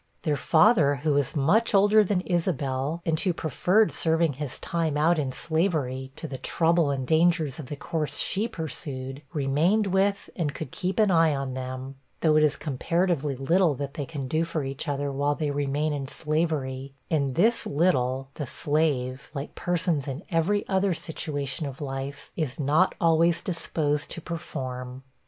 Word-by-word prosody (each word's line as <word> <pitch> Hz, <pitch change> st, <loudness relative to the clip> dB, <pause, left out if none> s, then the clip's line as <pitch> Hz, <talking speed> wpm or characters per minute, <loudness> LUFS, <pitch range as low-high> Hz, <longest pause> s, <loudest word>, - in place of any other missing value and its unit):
Their 150 Hz, -2 st, +1 dB
father, 160 Hz, -, +4 dB
who 145 Hz, +2 st, 0 dB
was 140 Hz, -2 st, 0 dB
much 200 Hz, +11 st, +3 dB
older 205 Hz, +2 st, +6 dB
than 195 Hz, -2 st, 0 dB
Isabel, 160 Hz, -4 st, -1 dB
and 160 Hz, -1 st, +1 dB
who 185 Hz, -1 st, +1 dB
preferred 180 Hz, -, +2 dB
serving 160 Hz, -1 st, +2 dB
his 140 Hz, 0 st, -5 dB
time 165 Hz, -3 st, -1 dB
out 160 Hz, +2 st, +3 dB
in 135 Hz, -3 st, -1 dB
slavery, 145 Hz, -5 st, -1 dB
to 160 Hz, -, -6 dB
the 135 Hz, -3 st, -6 dB
trouble 165 Hz, -2 st, +2 dB
and 135 Hz, -2 st, -1 dB
dangers 160 Hz, -1 st, +2 dB
of 145 Hz, -, -7 dB
the 145 Hz, -, -5 dB
course 155 Hz, +1 st, -3 dB
she 210 Hz, +4 st, 0 dB
pursued, 135 Hz, -, -6 dB
remained 160 Hz, +8 st, +2 dB
with 195 Hz, +1 st, +1 dB
and 150 Hz, -5 st, -2 dB
could 150 Hz, -5 st, -6 dB
keep 185 Hz, +1 st, -3 dB
an 215 Hz, -3 st, +4 dB
eye 165 Hz, -3 st, +4 dB
on 135 Hz, -1 st, -3 dB
them 130 Hz, +1 st, -6 dB, 0.2 s
though 155 Hz, -2 st, +4 dB
it 155 Hz, -, +5 dB
is 150 Hz, -1 st, +3 dB
comparatively 155 Hz, 0 st, 0 dB
little 160 Hz, +4 st, +2 dB
that 140 Hz, +1 st, -5 dB
they 145 Hz, -3 st, -4 dB
can 140 Hz, -5 st, -5 dB
do 160 Hz, +5 st, +1 dB
for 165 Hz, -2 st, -2 dB
each 135 Hz, +3 st, -5 dB
other 145 Hz, 0 st, -1 dB
while 145 Hz, +2 st, 0 dB
they 150 Hz, -2 st, -1 dB
remain 145 Hz, +2 st, 0 dB
in 140 Hz, -2 st, -3 dB
slavery; 140 Hz, -4 st, -2 dB, 0.2 s
and 140 Hz, -5 st, +1 dB
this 225 Hz, +6 st, +2 dB
little 135 Hz, -4 st, +1 dB
the 145 Hz, -1 st, -5 dB
slave, 135 Hz, -3 st, -1 dB
like 140 Hz, +1 st, -5 dB
persons 175 Hz, -5 st, -1 dB
in 135 Hz, +6 st, -5 dB
every 180 Hz, +5 st, +1 dB
other 190 Hz, -2 st, +1 dB
situation 145 Hz, -3 st, -4 dB
of 135 Hz, -1 st, -8 dB
life, 140 Hz, 0 st, -5 dB
is 155 Hz, -5 st, -3 dB
not 150 Hz, +6 st, +3 dB
always 165 Hz, 0 st, +3 dB
disposed 155 Hz, -4 st, -1 dB
to -, -, -5 dB
perform. 130 Hz, -6 st, -6 dB
150 Hz, 170 wpm, -26 LUFS, 135-170 Hz, 0.2 s, older